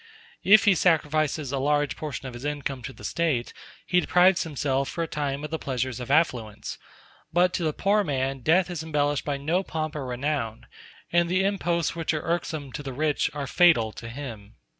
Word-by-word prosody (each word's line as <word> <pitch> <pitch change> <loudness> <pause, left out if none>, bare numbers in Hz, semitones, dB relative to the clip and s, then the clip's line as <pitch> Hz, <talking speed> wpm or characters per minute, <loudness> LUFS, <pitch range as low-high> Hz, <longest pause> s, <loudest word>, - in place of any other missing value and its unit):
If 215 +3 +7
he 205 - +6
sacrifices 155 -4 +1
a 140 - -1
large 145 +1 +1
portion 145 -3 -5
of 130 - -7
his 120 +2 -9
income 145 -3 -3
to 135 - -6
the - - -15
State, 155 -8 -1 0.3
he 180 - +3
deprives 180 +1 +4
himself 140 -3 -1
for 170 - -2
a - - -3
time 145 -2 -3
of 150 - -5
the 160 - -2
pleasures 130 -2 -2
of 125 - -6
affluence; 125 -8 0 0.5
but 180 +2 +3
to 175 - -1
the 155 - +1
poor 205 +6 +2
man 135 -4 -1
death 175 +8 +3
is 170 -3 -4
embellished 145 -2 0
by 145 -1 -1
no 160 +7 0
pomp 155 -4 -4
or 140 -3 -4
renown, 125 -3 -2 0.5
and 170 0 +3
the 185 +2 +2
imposts 175 -5 0
which 165 -1 -1
are 155 - -3
irksome 160 -4 -2
to - - -5
the 135 -2 -6
rich 150 +2 +1
are 145 -1 -3
fatal 145 -9 +4
to 115 +1 -9
him. 115 -5 -8
150 Hz, 200 wpm, -26 LUFS, 135-170 Hz, 0.5 s, If